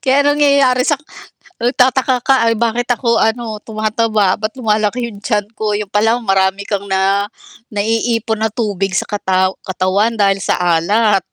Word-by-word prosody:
kaya 275 +1 +2
ang 290 +1 +2
nangyayari 275 -3 +3
sa 295 - +3 0.7
nagtataka 255 +1 +2
ka, 270 +2 +2 0.2
"Ay 230 - -1
bakit 235 +2 -1
ako 235 -1 +1
ano 220 -1 -2
tumataba, 215 -2 0
ba't 215 +1 -3
lumalaki 215 +1 0
yung 205 -3 -11
tiyan 210 -3 -1
ko," 215 -1 -2
yun 210 0 -2
pala 220 +4 +1
marami 195 -2 0
kang 200 -2 -2
na 195 +2 +1 0.4
naiipon 225 +1 -1
na 220 - +1
tubig 200 -3 -2
sa - - -2
kataw 190 -2 0
katawan 195 +5 0
dahil 195 -1 +2
sa - - 0
alat. 190 +5 +2
215 Hz, 160 wpm, -16 LUFS, 200-235 Hz, 0.7 s, nangyayari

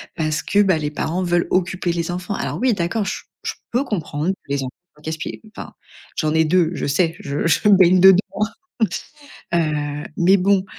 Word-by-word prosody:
parce 155 -1 -1
que, 205 +1 +3
bah, 185 -5 +2
les 150 -1 -2
parents 160 +4 -2
veulent 175 -1 +1
occuper 185 -1 0
les 170 0 -2
enfants. 180 +3 -3
Alors - - -3
oui, 255 -1 +3
d'accord, 200 +3 -1
je - - -3 0.2
je - - -2 0.2
peux 245 +4 +1
comprendre, 175 - -2
les 140 -1 -1
enfants 130 - -5 0.3
casse 160 +1 -3
pieds, 155 - -6 0.2
enfin, - - -8 0.4
j'en 155 -1 0
ai 160 0 +4
2, 165 +1 +2
je - - -3
sais. 165 +3 +1
Je 140 +2 -3
je 170 +5 +3
baigne 185 -2 +6
dedans, 190 0 +8 1.4
heu, 150 -3 -1
mais 185 +3 +5
bon, 190 +1 +2
175 Hz, 185 wpm, -21 LUFS, 155-190 Hz, 1.4 s, dedans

